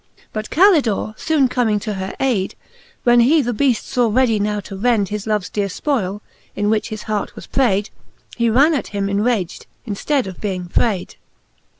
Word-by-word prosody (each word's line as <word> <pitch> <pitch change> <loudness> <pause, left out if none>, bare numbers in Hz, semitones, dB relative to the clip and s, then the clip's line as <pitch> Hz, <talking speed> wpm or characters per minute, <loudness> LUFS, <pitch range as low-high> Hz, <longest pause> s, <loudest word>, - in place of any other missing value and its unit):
But 215 0 -4
Calidore 300 - +3
foone 300 -1 +2
comming 235 -4 +1
to 215 0 -3
her 190 0 -5
ayde, 230 -8 0 0.5
when 240 0 +5
he 275 +7 +5
the 245 0 -1
beaft 245 0 +1
faw 245 -2 +1
ready 235 -2 +3
now 210 0 0
to 195 - -9
rend 210 -2 +1
His 210 0 -4
loves 210 -4 0
dear 205 -1 -2
fpoile, 205 -2 -2 0.3
in 205 +1 0
which 220 +1 0
his 215 -1 -6
heart 215 -2 -3
was - - -9
prayde, 210 -6 +1 0.4
He 235 -1 +1
ran 280 +8 +4
at 285 - -1
him 200 - 0
enragd, 200 -2 -1 0.2
in 215 - -3
ftead 275 +6 0
of 190 -2 -8
being 185 -4 -3
frayde. 195 +1 -1
215 Hz, 185 wpm, -19 LUFS, 200-250 Hz, 0.5 s, when